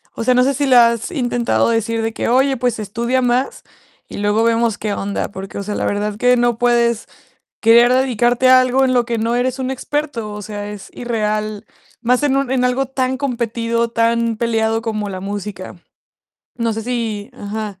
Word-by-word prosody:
o 230 - -3
sea, 255 - +3
no 250 - +5
sé, 275 +1 +2
si 285 +2 -1
le 255 - +5
has 235 - +3
intentado 245 -7 0
decir 230 0 0
de 225 0 -2
que: - - -2
"Oye, 265 +1 +3
pues, 245 -2 -1
estudia 235 +5 -1
más 250 +2 0 0.4
y - - -9
luego 205 +2 +1
vemos 230 -1 +1
qué 210 -1 -3
onda". 200 0 -3
Porque, 195 0 -8
o 200 - -3
sea, 210 +1 -4
la - - -2
verdad 205 +1 -1
que 250 +2 +3
no 240 -1 +1
puedes 235 -1 +1 0.5
querer 235 +2 +6
dedicarte 250 -1 +2
a 255 0 +8
algo 255 +1 +2
en 255 -1 +2
lo 240 -2 +2
que 235 -1 -2
no 230 +2 0
eres 255 +2 -1
un 260 0 -2
experto. 265 -5 -3
O 210 - -6
sea, 205 0 -6
es 205 -2 -9
irreal, 215 -2 -2 0.4
más 250 +3 +2
en 275 -2 +2
un 275 -2 0
en 255 -1 +2
algo 250 +1 0
tan 260 -1 -1
competido, 235 -3 -1
tan 230 0 +1
peleado 225 -1 0
como 215 -2 -3
la 185 - -5
música. 200 -2 -6 0.8
No 230 -1 0
sé, 225 +1 -4
si 225 -2 -3
Ajá. 210 -3 -6
235 Hz, 200 wpm, -18 LUFS, 215-250 Hz, 0.8 s, a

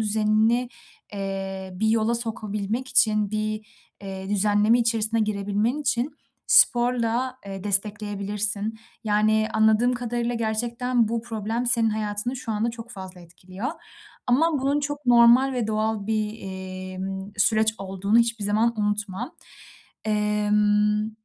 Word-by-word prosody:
düzenini, 220 +3 +2 0.4
eee, 195 -1 -4
bir 220 +4 0
yola 225 +1 +2
sokabilmek 225 +1 -3
için, 210 -4 +3
bir, 215 0 -3 0.4
eee, 190 -1 -6
düzenleme 210 +3 +3
içerisine 230 -1 +1
girebilmen 210 +4 0
için 260 0 0 0.4
sporla, 245 +1 +3
eee, 195 -1 -7
destekleyebilirsin. 205 +1 -2 0.3
Yani, 215 +1 +2
anladığım 220 +3 +3
kadarıyla, 240 0 -2
gerçekten 235 +1 0
bu 230 0 -2
problem 225 +1 -3
senin 230 -2 +3
hayatını 215 +3 -2
şu 245 -3 -4
anda 220 +2 0
çok 230 0 -10
fazla 190 -4 -9
etkiliyor 185 - -7 0.6
ama 310 +7 +3
bunun 280 +2 +1
çok 290 -1 -5
normal 240 +3 +6
ve 245 -4 -1
doğal 215 -1 -1
bir, 215 -1 0
eee, 185 -3 -7
ımm, 190 +1 -5
süreç 220 +1 +2
olduğunu 195 +3 0
hiçbir 230 -2 +1
zaman 220 +2 +1
unutma. 210 - -2 0.7
Emm, 210 0 +2
215 Hz, 120 wpm, -24 LUFS, 205-235 Hz, 0.7 s, normal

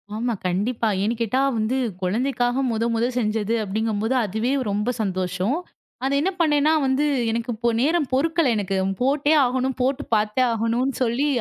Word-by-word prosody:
ஆமா 235 +2 -1
கண்டிப்பா. 220 +6 -1
ஏன்னு 220 +4 0
கேட்டா 230 +4 +1 0.2
வந்து 220 +4 0 0.2
குழந்தைக்காக 245 +6 0
மொத 225 0 0
மொத 230 +1 +1
செஞ்சது 220 0 0
அப்படிங்கும்போது, 220 +3 -1
அதுவே 220 +5 -1 0.2
ரொம்ப 210 +3 -1
சந்தோஷம். 185 - -1 0.5
அது 270 - 0
என்ன 375 +5 +1
பண்ணேன்னா 300 -1 +3
வந்து, 265 +3 +1 0.3
எனக்கு 235 +2 -3
இப்போ 235 +2 0
நேரம் 305 +1 +1
பொறுக்கல 320 +1 +2
எனக்கு. 195 -1 -1 0.3
போட்டே 285 +3 +2
ஆகணும், 260 +1 -1
போட்டுப் 260 0 -1
பார்த்தே 215 +4 +1
ஆகணும்னு 230 +4 0
சொல்லி 245 +5 0
235 Hz, 145 wpm, -23 LUFS, 215-265 Hz, 0.5 s, பண்ணேன்னா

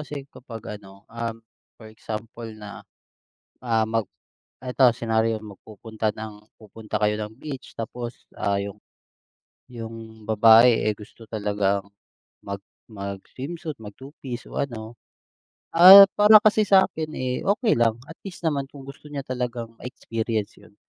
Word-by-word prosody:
kasi 145 -2 -7
kapag 115 -4 -9
ano, 100 0 -16
um, 115 -1 -4 0.4
for 110 - -13
example 110 +1 -7
na, 105 -1 -10 0.8
ah, 115 -2 +1
mag 110 -1 -1 0.6
ito 125 +1 +2
senaryo, 110 -1 0
magpupunta 110 +2 -6
ng 105 -1 -9
pupunta 110 0 -7
kayo 105 0 +2
ng 105 0 -5
beach 135 0 -9
tapos, 120 +1 -6
ah, 100 0 0
yung, 100 +1 -5 0.9
yung 115 -2 -9
babae, 115 +2 +6
eh, - - 0
gusto 110 +2 -14
talagang 100 -2 -1 0.6
mag 100 0 -5 0.3
mag-swimsuit, 130 - -7
mag-two 130 +7 -11
piece 125 -3 -6
o - - -5
ano, 115 -3 -5 0.8
ah, 190 +4 +11
para 210 +1 +8
kasi 215 0 +4
sa'kin, 160 -5 +3
eh, 130 -1 -2 0.2
okey 220 -2 +2
lang. 115 -2 +2
At 160 - -10
least 185 -3 -9
naman 140 -3 -1
kung 140 -2 -12
gusto 140 +2 -12
niya 140 -2 -5
talagang 120 -2 -4
ma-experience 115 -3 -4
yun. 100 - -19
115 Hz, 135 wpm, -24 LUFS, 110-130 Hz, 0.9 s, ah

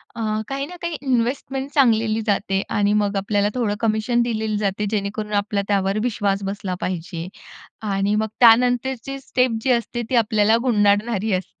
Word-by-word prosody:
अ, 230 - -5 0.3
काही 275 0 -3
ना 360 - -10
काही 340 -1 -3
इन्व्हेस्टमेंट 265 +1 -1
सांगितलेली 225 -5 +3
जाते 195 -1 +1
आणि 205 0 +1
मग 205 0 -1
आपल्याला 200 +1 +1
थोडं 220 -4 0
कमिशन 225 +2 +1
दिले 220 -2 -1
जाते 205 0 -1
जेणेकरून, 210 0 -3
आपला 205 0 0
त्यावर 195 0 +1
विश्वास 200 -4 -1
बसला 195 -1 -3
पाहिजे 175 -1 -4 0.6
आणि 195 +1 +1
मग 220 0 0
त्यानंतरची 245 +3 +3
स्टेप 250 -3 0
जी 260 - 0
असते 240 0 -1
ती 255 - +2
आपल्याला 220 0 +3
गुंडाळणारी 210 -2 +2
असते. 185 0 -4
215 Hz, 155 wpm, -21 LUFS, 200-240 Hz, 0.6 s, सांगितलेली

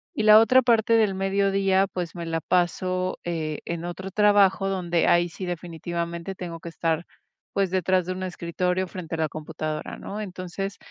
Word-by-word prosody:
Y 220 - 0
la 215 0 +9
otra 255 +3 +5
parte 230 -2 +3
del 220 -3 +4
mediodía, 195 0 +2
pues, 175 -1 -4
me 170 - -5
la 165 0 -2
paso, 185 +2 0
eh, 160 -3 -3
en 170 0 -4
otro 185 +2 -5
trabajo, 205 -1 +4
donde 175 -3 0
ahí 175 0 +4
sí 185 +3 -7
definitivamente 170 0 -4
tengo 170 -2 -6
que 170 - -8
estar, 165 0 -1 0.5
pues, 195 -2 +1
detrás 185 -1 +2
de 185 - -2
un 185 - -6
escritorio 180 +1 -1
frente 170 -3 -6
a - - -5
la 160 -1 0
computadora, 155 0 -5
¿no? 210 +2 -6
Entonces, 195 +1 -5
180 Hz, 175 wpm, -25 LUFS, 170-195 Hz, 0.5 s, la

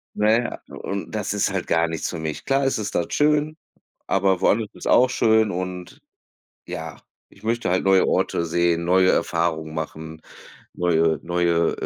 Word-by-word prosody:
Na 105 +1 +3
ja, 120 +2 0
und 100 0 -6
das 105 -2 -2
ist 105 0 0
halt 95 -2 -3
gar 85 0 +2
nichts 80 -1 -3
für 85 - -5
mich. 80 -1 -5
Klar 135 0 +1
ist 135 - +1
es 105 - -4
dort 85 - -2
schön, 150 +1 +1 0.5
aber 95 -1 +1
woanders 105 0 +2
ist - - -8
auch 125 0 +5
schön 110 -4 +3
und 90 -1 -6 0.7
ja, - - -6 0.3
ich 100 - -21
möchte 115 -3 -1
halt 95 - +1
neue 95 -1 +4
Orte 85 - 0
sehen, 85 0 +1
neue 95 +1 +4
Erfahrungen 80 -2 -1
machen, 80 0 -6 0.5
neue 80 -2 +2
neue, 85 -1 +1
90 Hz, 165 wpm, -23 LUFS, 85-110 Hz, 0.7 s, auch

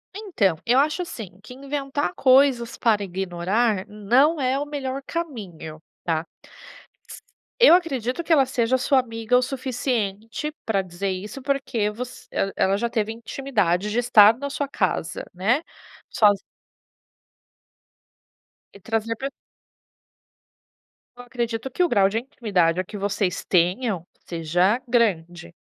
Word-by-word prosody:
Então, 330 - 0
eu 245 +2 +3
acho 300 +6 +2
assim 210 - -8
que 250 - -11
inventar 280 +2 -3
coisas 260 -5 +3
para 215 -3 +2
ignorar 190 +3 -1
não 250 +10 +2
é 265 0 +1
o 290 - -2
melhor 275 -2 -4
caminho, 195 - -6 0.2
tá. 160 -2 0 0.9
S - - -10 0.4
eu 485 - +9
acredito 275 -4 -1
que 335 - -5
ela 275 -4 +5
seja 255 -1 +1
a - - +3
sua 260 +1 +3
amiga 230 0 0
o - - +3
suficiente 250 -1 -3
pra 200 -3 +1
dizer 185 +2 -4
isso, 205 +8 -6
porque 260 -6 -1
voc 240 +4 -6 0.2
el 195 - -1
ela 195 +1 +2
já 235 +3 -1
teve 220 -2 -1
intimidade 215 -6 -1
de 225 +3 0
estar 225 -2 +6
na 280 +1 -4
sua 285 0 -3
casa, 185 - -2
né, 215 - +1 0.5
sozi 205 -3 +4 2.4
E - - -12
trazer 225 +2 -2
pra 270 +5 -4 1.9
Eu 245 - -10
acredito 240 0 -3
que 360 - 0
o 350 - +3
grau 200 -6 +4
de 220 +3 -1
intimidade 190 - 0
que 205 - -9
vocês 200 -2 -1
tenham 185 +2 +1 0.2
seja 175 +6 +1
grande, 175 -8 0
230 Hz, 135 wpm, -23 LUFS, 195-265 Hz, 2.4 s, eu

